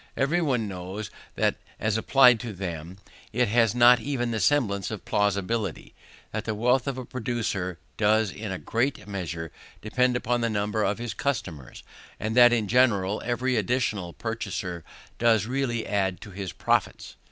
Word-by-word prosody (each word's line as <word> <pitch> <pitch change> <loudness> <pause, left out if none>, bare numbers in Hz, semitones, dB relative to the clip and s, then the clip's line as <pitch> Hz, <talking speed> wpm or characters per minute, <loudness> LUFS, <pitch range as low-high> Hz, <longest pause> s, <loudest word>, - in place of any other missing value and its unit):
Every 150 +6 +2
one 125 -9 0
knows 95 +2 -6 0.2
that - - +1 0.2
as 110 0 0
applied 125 +1 +5
to 115 -2 -6
them 90 -2 -6 0.3
it 120 0 +1
has 115 0 +3
not 125 0 +7
even 120 -1 -2
the 110 - -1
semblance 100 -3 +1
of - - -7
plausibility; 100 -1 -1 0.4
that 110 0 -4
the 110 - -2
wealth 125 +4 +2
of 135 -2 -2
a 130 - -5
producer 110 -8 -3 0.2
does 110 -1 +3
in 105 +1 -6
a 95 - -3
great 115 - -2
measure 85 -5 -5 0.3
depend 125 +3 +1
upon 120 0 0
the 115 - +1
number 105 0 -1
of 105 - 0
his 120 -1 -4
customers, 95 - -4 0.4
and 110 +1 -2
that 120 -1 +8
in 115 -3 +1
general 105 -4 +2
every 125 +1 0
additional 105 -5 -1
purchaser 95 -6 -4 0.4
does 115 -3 +3
really 125 -2 -1
add 95 -3 0
to 105 - -10
his 95 -1 -5
profits. - - -1
110 Hz, 165 wpm, -26 LUFS, 100-120 Hz, 0.4 s, that